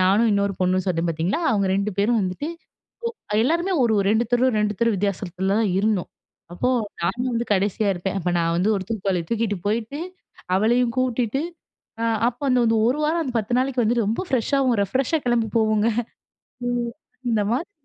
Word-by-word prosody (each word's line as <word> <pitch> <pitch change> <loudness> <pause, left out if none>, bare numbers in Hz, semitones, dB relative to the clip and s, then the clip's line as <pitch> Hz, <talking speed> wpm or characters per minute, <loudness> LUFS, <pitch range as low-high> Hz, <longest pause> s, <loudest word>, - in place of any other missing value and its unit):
நானும், 200 +5 +4
இன்னொரு 200 0 +1
பொண்ணும் 185 0 +1
சொன்னேன் 170 -1 0
பார்த்தீங்களா! 170 - -1
அவங்க 200 -2 +1
2 200 +2 0
பேரும் 220 +2 +3
வந்துட்டு, 185 - -3 0.8
ஒ - - +1
எல்லாருமே 340 +6 +1
ஒரு, 225 - +2
ஒரு 195 - 0
2 225 +2 +3
தெரு, 245 +2 +4
2 210 0 0
தெரு 230 -2 +3
வித்தியாசத்தில 195 0 -1
தான் 210 -4 +1
இருந்தோம். 205 -3 0 0.4
அப்போ 215 +8 -1 0.3
நான் 225 +9 -1
வந்து 235 +1 0
கடைசியா 205 +2 +1
இருப்பேன். 190 +2 -3
அப்ப 180 0 -1
நான் 165 0 +1
வந்து 185 +5 +1
ஒரு 190 - -3
தூக்குவாளிய 195 -5 -1
தூக்கிட்டு 225 -3 0
போயிட்டு, 230 +7 -1 0.6
அவளையும் 235 +3 +2
கூட்டிட்டு 250 0 0 0.6
அ - - +1 0.2
அப்ப 245 +2 -7
அந்த 250 -1 +3
இந்த 225 0 +3
ஒரு 270 +4 0
வாரம், 330 +2 +1
அந்த 255 - -4
10 225 +3 -1
நாளைக்கு 260 -1 +1
வந்துட்டு, 230 -1 +1
ரொம்ப 230 - -1
ஃப்ரெஷ்ஷாவும் 260 -1 +1
ரெஃப்ரெஷ்ஷா 265 - 0
கிளம்பி 235 -2 +2
போவோங்க 215 0 +2 0.8
ம். 240 -1 -1 0.4
அந்த 215 -3 +2
மாதிரி 330 +11 -2
220 Hz, 175 wpm, -23 LUFS, 195-245 Hz, 0.8 s, நானும்